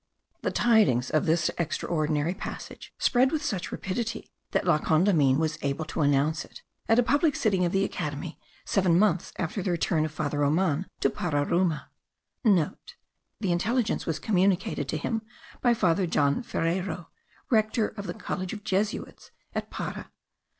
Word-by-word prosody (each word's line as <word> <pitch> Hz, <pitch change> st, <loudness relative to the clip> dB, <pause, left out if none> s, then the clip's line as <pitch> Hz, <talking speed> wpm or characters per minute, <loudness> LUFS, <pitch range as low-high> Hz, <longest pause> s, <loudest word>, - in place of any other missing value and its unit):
The -, -, 0 dB
tidings 150 Hz, -, +3 dB
of 155 Hz, -, +1 dB
this 160 Hz, 0 st, +2 dB
extraordinary 155 Hz, -1 st, 0 dB
passage 190 Hz, -, -8 dB
spread 260 Hz, +2 st, +3 dB
with 310 Hz, -1 st, -1 dB
such 190 Hz, -9 st, -2 dB
rapidity 225 Hz, +3 st, -4 dB, 0.2 s
that -, -, 0 dB
La 150 Hz, -, +4 dB
Condamine 155 Hz, -5 st, +3 dB
was 155 Hz, -1 st, -1 dB
able 140 Hz, +3 st, -2 dB
to 155 Hz, -, -3 dB
announce 145 Hz, +1 st, +2 dB
it* -, -, -14 dB, 0.3 s
at 225 Hz, -, +5 dB
a 245 Hz, -, +5 dB
public 290 Hz, +4 st, +2 dB
sitting 190 Hz, -5 st, +2 dB
of 170 Hz, -, 0 dB
the 195 Hz, +1 st, +2 dB
Academy, 150 Hz, -2 st, -4 dB, 0.3 s
seven 180 Hz, -4 st, +3 dB
months 185 Hz, -3 st, +2 dB
after 180 Hz, +4 st, -2 dB
the 185 Hz, -, -2 dB
return 170 Hz, -2 st, +1 dB
of 155 Hz, -, -2 dB
Father 150 Hz, -1 st, -2 dB
Roman 155 Hz, +3 st, +1 dB
to -, -, +3 dB
Pararuma. 165 Hz, +1 st, 0 dB, 0.3 s
(* -, -, -55 dB, 1.0 s
The 195 Hz, -4 st, 0 dB
intelligence 215 Hz, +7 st, 0 dB
was 160 Hz, -2 st, 0 dB
communicated 185 Hz, -5 st, +1 dB
to 155 Hz, -, -1 dB
him 225 Hz, +8 st, -2 dB, 0.4 s
by 240 Hz, -2 st, +4 dB
Father 185 Hz, -4 st, +2 dB
John 145 Hz, -, +2 dB
Ferreyro, 180 Hz, -4 st, -2 dB, 0.4 s
rector 220 Hz, 0 st, +2 dB
of 200 Hz, -2 st, -8 dB
the 175 Hz, -, -4 dB
college 185 Hz, 0 st, -4 dB
of 210 Hz, -2 st, -7 dB
Jesuits 210 Hz, +1 st, -2 dB, 0.2 s
at -, -, -3 dB
Para. -, -, -5 dB
175 Hz, 155 wpm, -27 LUFS, 155-210 Hz, 1.0 s, at